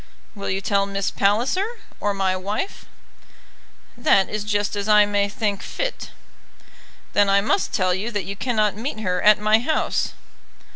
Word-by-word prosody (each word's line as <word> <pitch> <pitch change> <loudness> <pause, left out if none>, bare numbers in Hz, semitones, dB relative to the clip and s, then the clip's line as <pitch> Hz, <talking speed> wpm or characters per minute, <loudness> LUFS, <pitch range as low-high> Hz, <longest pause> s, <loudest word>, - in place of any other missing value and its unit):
"Will 200 -3 -5
you 190 +1 -1
tell 200 0 +1
Miss 195 -1 -2
Palliser, 270 - 0 0.2
or 205 - 0
my 190 -1 +1
wife?" 205 - -4 1.1
"That 200 -5 +3
is 210 -1 -3
just 205 0 -1
as 205 +1 -3
I 210 -1 +7
may 205 0 0
think 205 -1 -2
fit." - - -4 1.0
"Then 205 -1 +4
I 195 0 +5
must 220 - 0
tell 185 -2 +1
you 195 +5 -2
that 205 -5 -3
you 200 +2 -5
cannot 215 -3 0
meet 220 0 -5
her 180 -3 -1
at 210 0 +6
my 215 +1 +4
house." 310 +7 -1
205 Hz, 160 wpm, -22 LUFS, 195-220 Hz, 1.1 s, I